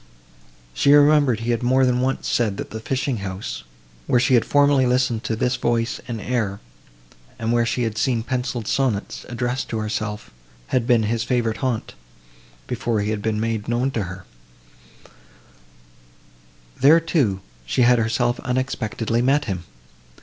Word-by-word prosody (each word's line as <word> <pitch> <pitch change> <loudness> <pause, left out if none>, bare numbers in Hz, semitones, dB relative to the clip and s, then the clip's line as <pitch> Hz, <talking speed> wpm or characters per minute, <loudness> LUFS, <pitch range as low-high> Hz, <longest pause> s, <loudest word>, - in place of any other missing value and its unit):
She 140 - +4
remembered 145 -5 +5
he 120 +1 -1
had 115 - 0
more 130 +2 +3
than 125 -1 +1
once 130 +1 -1
said 110 -5 0
that - - -6
the 110 - -5
fishing 130 +2 -2
house, 95 -1 -5 0.5
where 125 - +3
she 130 +2 +2
had 120 - +5
formerly 145 -2 +4
listened 125 -2 +1
to 110 - -1
this 125 +3 0
voice 120 -1 -1
and 120 -3 -4
air, 105 -4 -2 0.8
and 115 0 -2
where 120 -1 +2
she 125 - -1
had 110 -2 -2
seen 120 -4 +1
pencilled 125 -2 -3
sonnets, 125 -7 -1
addressed 120 +1 -2
to 115 - -2
herself, 105 - -4 0.4
had 125 -2 0
been 120 -2 +4
his 115 +1 0
favourite 120 -3 0
haunt, 130 -4 -2 0.7
before 115 -3 -1
he 105 +1 -1
had 105 -1 -2
been 110 0 -1
made 110 -1 -2
known 120 +3 0
to 110 -6 -2
her; 90 +1 -9 2.5
there, 150 +5 +6
too, 140 - 0 0.3
she 125 - +2
had 120 0 +5
herself 120 +2 0
unexpectedly 120 -3 -1
met 140 +4 +2
him. 90 -5 -4
120 Hz, 155 wpm, -22 LUFS, 110-130 Hz, 2.5 s, there